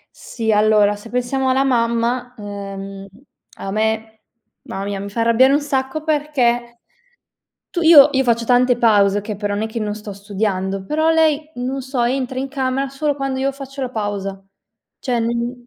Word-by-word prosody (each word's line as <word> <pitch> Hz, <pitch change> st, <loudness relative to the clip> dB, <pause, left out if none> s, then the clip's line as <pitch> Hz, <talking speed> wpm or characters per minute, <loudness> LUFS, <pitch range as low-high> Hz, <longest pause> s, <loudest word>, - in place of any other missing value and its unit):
Sì. 225 Hz, -2 st, -3 dB
Allora, 210 Hz, -1 st, +4 dB
se 205 Hz, +3 st, -12 dB
pensiamo 250 Hz, +2 st, -1 dB
alla 265 Hz, +1 st, +3 dB
mamma, 240 Hz, 0 st, 0 dB
ehm, 195 Hz, -1 st, -7 dB, 0.5 s
a 195 Hz, -, -5 dB
me 220 Hz, +1 st, -1 dB, 0.5 s
ma 195 Hz, +1 st, -6 dB
mia, 200 Hz, 0 st, -3 dB
mi 200 Hz, +1 st, -6 dB
fa 230 Hz, +3 st, -2 dB
arrabbiare 235 Hz, +4 st, +4 dB
un 290 Hz, -, +2 dB
sacco, 275 Hz, +1 st, -2 dB
perché 245 Hz, -6 st, 0 dB, 0.9 s
tu 350 Hz, -, -2 dB
io 320 Hz, -4 st, +9 dB
io 265 Hz, -, +2 dB
faccio 235 Hz, -1 st, +1 dB
tante 245 Hz, +1 st, +3 dB
pause, 205 Hz, -4 st, +4 dB
okay, 205 Hz, 0 st, -5 dB
però 205 Hz, 0 st, -2 dB
nè 210 Hz, +2 st, -1 dB
che 220 Hz, +1 st, -5 dB
non 210 Hz, -1 st, -2 dB
sto 210 Hz, -1 st, -8 dB
studiando. 195 Hz, -1 st, -3 dB
Però 315 Hz, +8 st, +1 dB
lei, 310 Hz, -1 st, +2 dB
non 260 Hz, +2 st, -3 dB
so, 260 Hz, -1 st, -2 dB
entra 255 Hz, +1 st, -1 dB
in 270 Hz, +1 st, -3 dB
camera 270 Hz, 0 st, -1 dB
solo 285 Hz, +2 st, -1 dB
quando 275 Hz, -1 st, -3 dB
io 270 Hz, +1 st, 0 dB
faccio 275 Hz, 0 st, -8 dB
la 255 Hz, -, -3 dB
pausa. 200 Hz, -3 st, -4 dB, 0.6 s
Cioè, 245 Hz, -3 st, -1 dB
n 235 Hz, +1 st, -3 dB
235 Hz, 170 wpm, -19 LUFS, 210-265 Hz, 0.9 s, io